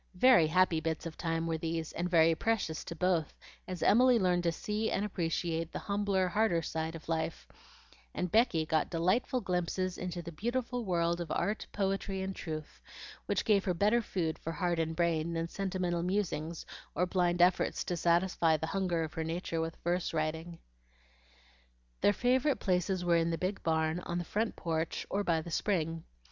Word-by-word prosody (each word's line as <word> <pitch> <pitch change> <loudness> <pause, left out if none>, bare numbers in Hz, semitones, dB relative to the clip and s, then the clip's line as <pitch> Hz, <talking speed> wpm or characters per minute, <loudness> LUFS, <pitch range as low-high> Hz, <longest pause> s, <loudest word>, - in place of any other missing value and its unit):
Very 210 -5 +6
happy 180 0 +3
bits 160 0 -3
of 165 -1 -6
time 165 -1 -1
were 165 -1 -1
these, 165 -1 -3
and 175 +1 -2
very 165 -1 +5
precious 190 -5 -1
to 170 - -6
both, 175 -3 0 0.3
as 185 -1 -4
Emily 250 +2 +6
learned 180 -4 +2
to 170 -1 +1
see 210 +6 -2
and 200 - 0
appreciate 165 -3 -2
the - - -4
humbler, 200 -2 0
harder 180 -3 +1
side 160 +1 -3
of 165 - -10
life, 160 0 -2 0.6
and 180 - -3
Becky 220 -9 +3
got 155 -1 +1
delightful 185 +9 +1
glimpses 180 0 -1
into 180 -1 -4
the 170 - -7
beautiful 240 +6 -2
world 170 -2 +1
of 170 - -5
art, 210 +6 -1
poetry, 195 -1 -1
and 190 0 -4
truth, 155 -3 -6 0.5
which - - 0
gave 205 -4 +4
her 180 - 0
better 210 +7 +3
food 165 -7 -2
for 165 - -4
heart 175 +1 0
and 160 0 -1
brain 170 -1 +1
than 165 0 -1
sentimental 180 -2 -2
musings 170 -4 -2 0.3
or 180 - +2
blind 180 -1 +1
efforts 180 +1 +3
to 175 - -2
satisfy 170 -1 +2
the 160 - -3
hunger 180 -4 0
of 160 - -5
her 160 - -2
nature 165 0 -2
with 165 0 -4
verse 175 -1 -1
writing. 160 +2 -2 1.4
Their - - +5
favorite 255 +6 +2
places 180 -1 0
were 170 -1 +4
in 165 0 +1
the 165 - -1
big 185 +3 -2
barn, 160 0 +1
on 175 -1 -4
the 175 - -3
front 220 +5 -1
porch, 165 -1 -2
or 200 +1 0
by 165 -4 +1
the 170 - -8
spring. 165 -3 -1
175 Hz, 180 wpm, -32 LUFS, 165-190 Hz, 1.4 s, Very